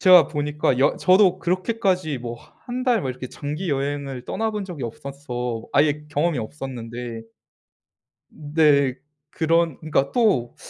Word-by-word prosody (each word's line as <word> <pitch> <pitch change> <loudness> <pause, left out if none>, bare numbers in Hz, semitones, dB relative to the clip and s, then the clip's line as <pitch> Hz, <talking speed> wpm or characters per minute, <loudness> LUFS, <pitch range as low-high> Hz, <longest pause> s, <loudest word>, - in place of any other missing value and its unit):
제가 180 -5 +8
보니까 150 -3 0
여 135 - +3
저도 185 0 +4
그렇게까지 185 - 0
뭐 120 -1 -6 0.3
1 250 +1 -3
달 245 -4 +3
뭐 130 - -2
이렇게 130 0 -7
장기 150 +4 -4
여행을 140 -2 -2
떠나본 215 -2 -2
적이 170 -8 -7
없어서 125 -2 -5
아예 150 +1 +2
경험이 150 0 0
없었는데 120 -2 -6 1.1
네 145 -3 +2 0.4
그런 165 -2 +1
그러니까 150 -3 0
또 200 - +2
145 Hz, 275 characters per minute, -23 LUFS, 130-180 Hz, 1.1 s, 제가